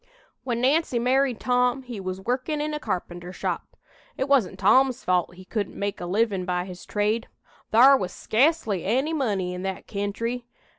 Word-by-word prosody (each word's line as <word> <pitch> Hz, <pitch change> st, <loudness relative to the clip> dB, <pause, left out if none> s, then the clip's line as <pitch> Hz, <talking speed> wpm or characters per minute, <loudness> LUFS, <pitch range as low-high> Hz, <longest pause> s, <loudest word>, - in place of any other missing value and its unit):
"When 240 Hz, -2 st, -2 dB
Nancy 275 Hz, 0 st, +2 dB
married 255 Hz, 0 st, +2 dB
Tom 250 Hz, +1 st, +1 dB
he 240 Hz, -4 st, -7 dB
was 185 Hz, 0 st, -4 dB
workin' 255 Hz, +7 st, -1 dB
in 300 Hz, +1 st, -2 dB
a 300 Hz, -, -2 dB
carpenter 175 Hz, -5 st, -4 dB
shop. -, -, -4 dB, 0.4 s
It 265 Hz, -, -1 dB
wasn't 245 Hz, -10 st, +2 dB
Tom's 250 Hz, +6 st, +4 dB
fault 180 Hz, -1 st, +1 dB
he 185 Hz, +1 st, -13 dB
couldn't 205 Hz, 0 st, -3 dB
make 200 Hz, -1 st, -3 dB
a 175 Hz, -, -4 dB
livin' 200 Hz, 0 st, +1 dB
by 180 Hz, -1 st, -1 dB
his 180 Hz, -1 st, -10 dB
trade. 215 Hz, +3 st, 0 dB, 0.4 s
Thar 260 Hz, +5 st, +8 dB
was 185 Hz, -8 st, -2 dB
sca'cely 230 Hz, -, +1 dB
any 265 Hz, +10 st, +1 dB
money 200 Hz, -, -1 dB
in 180 Hz, -, -5 dB
that 190 Hz, 0 st, -4 dB
kentry. 230 Hz, +4 st, -3 dB
225 Hz, 175 wpm, -25 LUFS, 185-260 Hz, 0.4 s, Thar